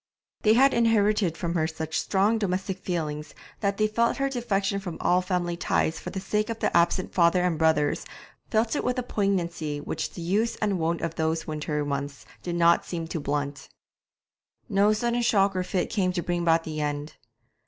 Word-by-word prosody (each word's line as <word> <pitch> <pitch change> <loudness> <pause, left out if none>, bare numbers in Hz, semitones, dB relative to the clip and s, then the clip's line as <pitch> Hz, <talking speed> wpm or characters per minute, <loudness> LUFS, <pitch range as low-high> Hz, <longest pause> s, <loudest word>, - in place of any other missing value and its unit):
They 215 - +5
had 270 +4 +5
inherited 210 -6 +2
from 170 -2 -2
her 160 -2 +1
such 160 0 -3
strong 205 +3 +2
domestic 190 -1 -2
feelings 155 -5 -4 0.2
that 200 -1 0
they 215 - +3
felt 230 +2 +1
her 275 0 0
defection 200 -6 -1
from 180 -4 -6
all 180 +1 +3
family 180 -2 -1
ties 165 -1 0
for - - -6
the 190 - -4
sake 210 +3 -1
of 230 - -3
the - - -1
absent 170 +2 +2
father 175 0 +4
and 180 -2 +1
brothers, 155 -2 +2 0.5
felt 225 +4 +1
it - - -1
with 250 +1 0
a 250 - 0
poignancy 175 -9 -1
which 145 - -4
the 175 - -7
use 210 +7 +1
and 205 -4 -1
wont 165 +1 0
of 165 -1 -2
those 160 0 0
winter 150 -1 -2
months 140 0 -4 0.2
did 175 -1 -3
not 170 0 +4
seem 165 -2 -4
to 165 - -3
blunt. 145 0 -3 1.0
No 205 -2 +3
sudden 235 +2 0
shock 200 -4 +3
or 185 - +1
fit 180 0 -2
came 185 -4 +1
to 175 -2 -2
bring 175 0 -1
about 165 -1 +3
the 155 -1 -4
end. 145 +1 -3
180 Hz, 195 wpm, -26 LUFS, 160-210 Hz, 1.0 s, They